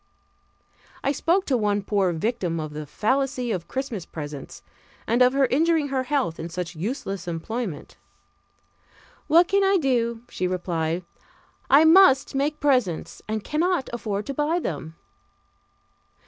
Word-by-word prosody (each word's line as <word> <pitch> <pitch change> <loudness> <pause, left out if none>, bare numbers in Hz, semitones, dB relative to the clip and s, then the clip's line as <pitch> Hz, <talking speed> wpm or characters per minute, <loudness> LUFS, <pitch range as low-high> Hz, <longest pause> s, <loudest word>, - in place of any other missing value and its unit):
I 275 - +2
spoke 345 +7 +1
to 270 - +1
one 205 -3 0
poor 195 -3 +1
victim 175 -1 -2
of 155 -1 -5
the 150 0 -6
fallacy 255 - 0
of 180 -5 -3
Christmas 260 -8 -4
presents, 145 -4 -8 0.4
and 235 +3 +1
of 250 +1 +6
her 275 0 +3
injuring 310 +2 +2
her 265 -1 0
health 260 - -1
in 165 +1 -5
such 175 0 -5
useless 195 - -4
employment. 175 +2 -5 1.3
"What 340 +3 +5
can 395 +1 +2
I 390 0 +4
do?" 235 -6 0
she 185 - -2
replied, 175 -2 -2 0.7
"I 290 +3 +7
must 325 -5 +6
make 290 +2 -1
presents 250 - 0
and 215 -1 -3
cannot 335 0 0
afford 210 -3 -3
to 275 - -4
buy 295 +4 0
them." 160 - -4
235 Hz, 140 wpm, -24 LUFS, 180-280 Hz, 1.3 s, I